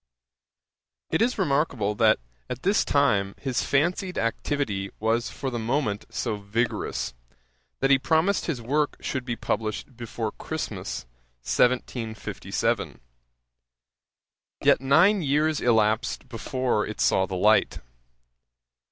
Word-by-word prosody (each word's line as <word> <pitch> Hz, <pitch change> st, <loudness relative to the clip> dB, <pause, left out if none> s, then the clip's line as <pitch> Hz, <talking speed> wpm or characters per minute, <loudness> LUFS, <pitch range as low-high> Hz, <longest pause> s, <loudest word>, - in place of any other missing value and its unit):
It -, -, +1 dB
is 245 Hz, +2 st, +2 dB
remarkable, 140 Hz, -, +1 dB
that 110 Hz, +1 st, +4 dB, 0.3 s
at 125 Hz, 0 st, -5 dB
this 200 Hz, +3 st, +3 dB
time 100 Hz, -9 st, +2 dB
his 130 Hz, -3 st, -1 dB
fancied 180 Hz, +6 st, 0 dB
activity 115 Hz, -4 st, -1 dB
was 115 Hz, +2 st, +1 dB
for 135 Hz, -, -4 dB
the 120 Hz, -, -3 dB
moment 115 Hz, -3 st, -1 dB
so 110 Hz, -4 st, -2 dB
vigorous, 100 Hz, -, -2 dB, 0.7 s
that 135 Hz, +1 st, +3 dB
he 135 Hz, -, +6 dB
promised 165 Hz, +7 st, +1 dB
his 130 Hz, -8 st, -2 dB
work 145 Hz, +5 st, 0 dB
should 130 Hz, -2 st, -3 dB
be 120 Hz, -2 st, -2 dB
published 110 Hz, +3 st, -3 dB
before 115 Hz, -2 st, -4 dB
Christmas, -, -, -5 dB, 0.4 s
1757. 120 Hz, -, -1 dB, 1.6 s
Yet -, -, +5 dB
nine 170 Hz, +10 st, +5 dB
years 150 Hz, +1 st, +1 dB
elapsed 110 Hz, 0 st, +1 dB
before 125 Hz, -1 st, -1 dB
it 110 Hz, -, -7 dB
saw 95 Hz, 0 st, +3 dB
the 95 Hz, -, -4 dB
light. 105 Hz, +4 st, +3 dB
125 Hz, 115 wpm, -26 LUFS, 110-145 Hz, 1.6 s, he